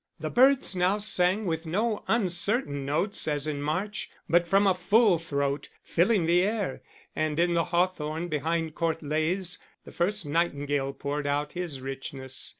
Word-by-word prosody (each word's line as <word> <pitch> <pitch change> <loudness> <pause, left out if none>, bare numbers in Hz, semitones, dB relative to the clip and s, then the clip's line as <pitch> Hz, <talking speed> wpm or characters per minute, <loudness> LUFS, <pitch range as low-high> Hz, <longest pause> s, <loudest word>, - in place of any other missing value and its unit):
The - - -4
birds 260 -4 +4
now 180 +3 +2
sang 205 0 +1
with 165 -1 -2
no 210 +6 -1
uncertain 185 - +1
notes 175 +8 0
as 145 -1 -1
in 150 -2 -3
March, 185 +8 -2 0.2
but 175 +1 +3
from 195 +3 +4
a 195 - +5
full 190 +1 +3
throat, 140 -3 -2
filling 180 +1 +2
the 175 +2 +4
air; 200 -7 -1 0.3
and 155 0 -1
in 175 0 +3
the 170 -1 +2
hawthorn 170 -2 -1
behind 160 +1 -1
Court 165 -1 -2
Leys 160 +5 0 0.3
the - - -11
first 185 +1 -1
nightingale 145 -3 -1
poured 145 +1 -3
out 145 +1 -1
his 170 -7 -5
richness. 135 0 -5
170 Hz, 155 wpm, -27 LUFS, 150-190 Hz, 0.3 s, a